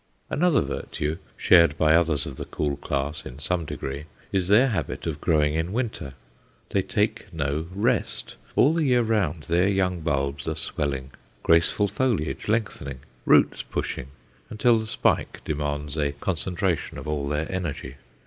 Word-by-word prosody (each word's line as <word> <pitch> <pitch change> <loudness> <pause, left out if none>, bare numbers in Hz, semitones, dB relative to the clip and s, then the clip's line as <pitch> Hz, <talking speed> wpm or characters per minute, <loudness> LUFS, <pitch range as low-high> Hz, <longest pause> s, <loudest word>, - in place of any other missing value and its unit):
Another 175 0 +3
virtue, 75 +3 -3 0.2
shared 85 -3 +5
by 80 0 +4
others 80 -4 +3
of 70 -3 -7
the - - -5
cool 75 -2 -2
class 70 +2 -3
in 65 - -9
some 85 +3 -1
degree, 70 +1 -5 0.3
is 95 -2 +1
their 115 +7 +5
habit 110 - -3
of 75 -3 -3
growing 75 -3 +2
in 80 +4 -1
winter. 110 - -3 0.6
They - - +2
take - - -1
no 75 +1 -2
"rest;" 110 +4 -1 0.2
all 145 +5 +5
the 165 -1 +1
year 125 -4 +3
round 95 -9 0
their 85 +4 +2
young 95 -3 +1
bulbs 70 -3 -1
are - - -1
swelling, 70 -2 -1 0.3
graceful 85 +5 +3
foliage 105 - -1
lengthening, 100 - -2 0.3
roots - - +5
pushing, - - -4 0.4
until 115 +2 +3
the 110 - -5
spike - - 0
demands 75 -1 -2
a 70 -1 0
concentration 90 +3 -1
of - - -7
all 75 -2 -1
their 75 +2 0
energy. 70 -8 -4
80 Hz, 155 wpm, -25 LUFS, 70-100 Hz, 0.6 s, shared